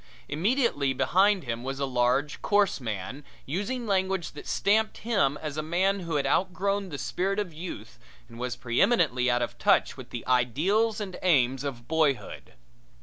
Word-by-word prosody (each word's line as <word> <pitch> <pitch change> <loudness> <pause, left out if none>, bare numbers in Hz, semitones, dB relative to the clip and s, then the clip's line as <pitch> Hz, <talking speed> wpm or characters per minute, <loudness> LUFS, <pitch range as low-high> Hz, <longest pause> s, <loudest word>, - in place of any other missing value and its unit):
Immediately 165 - +1
behind 190 +8 +3
him 120 -1 -4
was 135 +1 -4
a 140 - 0
large, 130 +3 0
coarse 205 -5 +2
man 110 +5 -5 0.2
using 205 - -3
language 190 -4 0
that 145 - -11
stamped 215 +2 +1
him 195 -12 +1
as 155 -1 -5
a - - 0
man 185 +5 +1
who 170 -4 -4
had 140 - +1
outgrown 195 +2 0
the 145 - -5
spirit 185 +9 -2
of 200 -5 -2
youth 170 +4 -8 0.3
and 115 - -12
was 125 0 -3
preeminently 125 - +2
out 120 0 +2
of - - -6
touch - - +3
with - - -10
the - - -6
ideals 170 - +2
and 195 -3 -6
aims 135 -7 +2
of 125 -4 -6
boyhood. 155 -5 -1
160 Hz, 165 wpm, -27 LUFS, 130-195 Hz, 0.3 s, behind